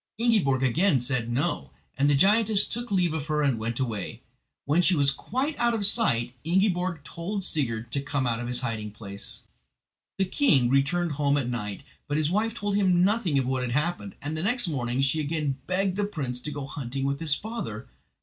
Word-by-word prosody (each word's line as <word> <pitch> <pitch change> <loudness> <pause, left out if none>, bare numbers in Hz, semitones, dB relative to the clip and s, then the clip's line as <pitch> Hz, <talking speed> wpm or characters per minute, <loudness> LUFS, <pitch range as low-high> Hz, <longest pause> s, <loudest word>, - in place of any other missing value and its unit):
Ingiborg 205 - +2
again 150 +4 +3
said 125 -2 -1
"No"; 70 - -1 0.2
and 140 +2 +2
the 145 - +4
giantess 210 +5 +4
took 240 +1 -5
leave 180 -4 +2
of 155 -2 -3
her 150 -1 +1
and 135 -6 +1
went 115 +2 -3
away. 115 -7 -3 0.4
When 150 +5 +3
she 180 +1 +3
was 140 -2 +3
quite 260 - -2
out 235 -1 +2
of 205 -3 +1
sight 120 - +2
Ingiborg 180 -2 +1
told 190 +8 -4
Sigurd 120 -9 -2
to 140 - 0
come 140 -1 -1
out 115 -2 0
of 120 - -4
his 125 0 +4
hiding 115 -4 -3
place. 100 -1 -6 0.7
The 195 - +2
king 170 - +3
returned 165 +5 +2
home 145 0 +1
at 135 -4 -1
night, 105 -5 -4 0.2
but 145 - 0
his 155 +1 +1
wife 220 +3 0
told 205 -2 -2
him 185 -3 +3
nothing 195 -7 +2
of 135 - +1
what 130 0 -1
had 125 -1 -2
happened, 150 - -1
and 150 +2 -3
the 155 - -2
next 230 +4 +2
morning 125 -4 -1
she 135 +3 +1
again 150 -2 -1
begged 185 0 0
the 205 - +1
prince 135 -11 -4
to 150 +4 -6
go 145 -1 -5
out 135 - -8
hunting 135 -1 -4
with 140 0 -1
his 155 -3 +1
father. 135 - -6
145 Hz, 205 wpm, -27 LUFS, 125-190 Hz, 0.7 s, the